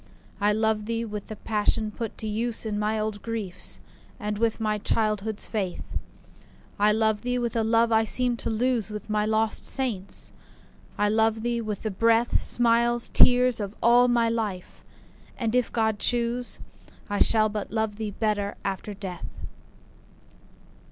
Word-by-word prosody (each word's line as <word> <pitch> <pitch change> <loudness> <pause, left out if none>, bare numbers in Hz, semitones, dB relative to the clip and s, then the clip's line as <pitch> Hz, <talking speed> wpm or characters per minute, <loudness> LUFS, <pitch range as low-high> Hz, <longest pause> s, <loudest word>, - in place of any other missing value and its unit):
I 205 0 +3
love 215 0 0
thee 230 0 -2
with 210 -2 -6
the 215 - -6
passion 215 0 0
put 225 +1 -6
to 220 - -5
use 225 +2 0
In 210 -1 -2
my 215 +1 0
old 215 -1 -3
griefs, 220 -6 -2 0.4
and 210 0 -3
with 230 0 +1
my 215 -1 0
childhood's 215 0 0
faith. 195 -5 -4 0.9
I 210 +1 +5
love 220 -1 +1
thee 250 0 -1
with 240 -2 -2
a 225 - +2
love 230 +1 +3
I 220 0 +4
seemed 240 +2 +1
to - - -2
lose 230 0 0
With 210 0 -7
my 210 0 +1
lost 220 0 +1
saints,—I 210 -3 -3
love 220 +1 +1
thee 240 -1 -1
with 215 -3 -5
the 220 - -2
breath, 230 +4 +2
Smiles, 235 0 +2
tears, 250 -1 +6
of 205 0 -5
all 240 +1 +6
my 240 -1 +2
life!—and, 220 +1 -5
if 250 -1 +1
God 220 -2 0
choose, 240 0 0 0.5
I 205 - -2
shall 215 -1 +5
but 210 -1 -4
love 220 -1 -2
thee 215 -1 -3
better 205 -1 -1
after 200 +1 -4
death. 190 -3 -6
220 Hz, 155 wpm, -26 LUFS, 210-230 Hz, 0.9 s, tears